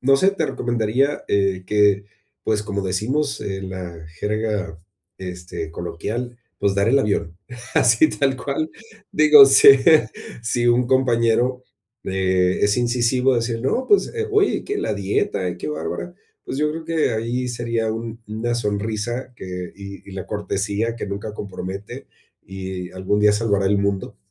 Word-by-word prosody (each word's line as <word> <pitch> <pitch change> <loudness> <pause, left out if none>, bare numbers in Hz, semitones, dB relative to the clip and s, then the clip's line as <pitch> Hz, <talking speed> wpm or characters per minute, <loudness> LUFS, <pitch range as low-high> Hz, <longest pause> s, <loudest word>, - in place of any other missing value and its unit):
No 135 +1 +4
sé, 190 +6 +4
te 200 - -2
recomendaría, 120 +4 0
eh, 95 -2 +1
que, 100 -1 +3 0.4
pues, 105 -1 0
como 100 -1 -3
decimos 120 +11 -1
en 95 -1 -4
la 85 -4 -7
jerga, 105 -6 -2 0.4
este, 90 -3 -6
coloquial, 115 +9 -5 0.2
pues, 100 -1 +1
dar 100 +2 +2
el 135 +4 +4
avión, 85 -8 -1 0.4
así 115 +7 +5
tal 135 -3 0
cual, 140 +4 -2 0.4
digo, 150 -2 +8
si 135 0 +7 0.7
si 120 +1 0
un 120 +1 +3
compañero, 125 -1 +2 0.4
eh, 95 -1 +1
es 105 +3 +3
incisivo 125 +2 +2
a - - +1
decir: 115 0 -1
"No, 245 - 0
pues, 410 - +3
eh, 450 -1 -2
uy, 415 -1 +2
qué 410 0 -3
la - - -1
dieta, 95 -2 -1
qué - - -5
bárbara". 80 - -4 0.3
Pues, - - -5
yo 150 0 +1
creo 160 +1 -6
que 160 -5 +1
ahí 120 +3 -2
sería 115 -2 -2
un 115 0 -6
una 110 +3 -2
sonrisa 110 +3 -3
que 90 -1 -6
y 100 0 -10
y - - -9
la 95 -1 -6
cortesía 105 +2 -2
que - - -5
nunca 100 +2 -5
compromete, 95 0 -7 0.4
y 95 -1 -6
algún 95 +3 -1
día 105 0 +5
salvará 100 -3 +1
el 100 - +3
mundo. 100 +1 -2
110 Hz, 155 wpm, -21 LUFS, 95-125 Hz, 0.7 s, digo